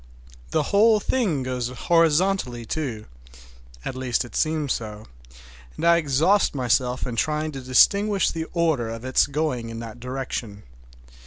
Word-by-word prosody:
The 155 Hz, -, +1 dB
whole 215 Hz, +1 st, +5 dB
thing 200 Hz, -, 0 dB
goes 125 Hz, -2 st, -2 dB
horizontally, 160 Hz, -2 st, +1 dB
too, 120 Hz, -5 st, -4 dB, 0.8 s
at -, -, -3 dB
least 125 Hz, -2 st, -1 dB
it 120 Hz, -, -12 dB
seems 155 Hz, -3 st, 0 dB
so, 105 Hz, -1 st, -6 dB, 0.7 s
and -, -, -3 dB
I 170 Hz, 0 st, +6 dB
exhaust 160 Hz, +5 st, +2 dB
myself 125 Hz, 0 st, 0 dB
in 125 Hz, -, -4 dB
trying 155 Hz, +5 st, -1 dB
to 135 Hz, -2 st, -7 dB
distinguish 200 Hz, +10 st, +3 dB
the 160 Hz, -1 st, -4 dB
order 160 Hz, -9 st, 0 dB
of 115 Hz, +2 st, -7 dB
its 130 Hz, -, +3 dB
going 140 Hz, -6 st, -2 dB
in 115 Hz, -, -7 dB
that 115 Hz, 0 st, -9 dB
direction. 125 Hz, -5 st, -5 dB
135 Hz, 145 wpm, -24 LUFS, 120-165 Hz, 0.8 s, I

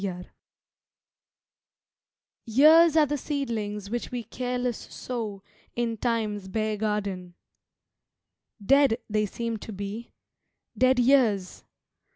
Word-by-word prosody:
Time's 195 Hz, -2 st, -1 dB
Garden 180 Hz, 0 st, -11 dB, 2.1 s
YEARS 310 Hz, +7 st, +6 dB
are 310 Hz, -, +6 dB
the 295 Hz, 0 st, -2 dB
seedlings 215 Hz, -8 st, -4 dB
which 240 Hz, 0 st, -3 dB
we 245 Hz, -1 st, -4 dB
careless 250 Hz, +1 st, -3 dB
sow 215 Hz, -6 st, -6 dB, 0.3 s
In 235 Hz, -1 st, -1 dB
Time's 215 Hz, -4 st, -2 dB
bare 215 Hz, +2 st, -1 dB
garden. 200 Hz, -4 st, -3 dB, 1.3 s
Dead 275 Hz, -1 st, +4 dB
they 215 Hz, -1 st, 0 dB
seem 230 Hz, +2 st, -4 dB
to 220 Hz, -, -9 dB
be 205 Hz, +3 st, -6 dB, 0.6 s
Dead 255 Hz, 0 st, +3 dB
years! 240 Hz, -7 st, +2 dB
225 Hz, 105 wpm, -26 LUFS, 205-250 Hz, 2.1 s, YEARS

